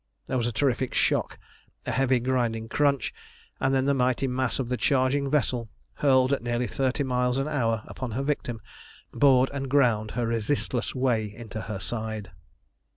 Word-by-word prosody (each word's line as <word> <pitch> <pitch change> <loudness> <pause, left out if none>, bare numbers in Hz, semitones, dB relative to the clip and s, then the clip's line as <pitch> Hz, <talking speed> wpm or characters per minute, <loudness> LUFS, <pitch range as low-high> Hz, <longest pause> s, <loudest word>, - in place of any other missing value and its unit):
There 130 - -1
was 120 -1 0
a - - -1
terrific 130 +2 0
shock, - - +1 0.5
a - - -2
heavy, 130 -1 +2
grinding 120 -3 -1
crunch, 140 -1 +1 0.5
and 135 - +1
then 135 -1 +2
the 140 - +3
mighty 130 0 +1
mass 130 -1 -1
of 130 - -2
the 125 - 0
charging 135 +1 +1
vessel, 125 -5 0 0.2
hurled 130 -1 +3
at 140 - 0
nearly 120 +1 -1
thirty 135 +3 0
miles 125 -1 0
an 135 +2 0
hour 115 -7 0
upon 130 - -6
her 135 +5 -1
victim, 125 -5 -2 0.5
bored 135 -2 +4
and 135 -1 -3
ground 120 -6 +3
her 120 - +1
resistless 115 +2 -1
way 120 -5 +1
into 110 -1 -7
her 105 -2 -5
side. 110 +1 -4
125 Hz, 170 wpm, -26 LUFS, 115-135 Hz, 0.5 s, bored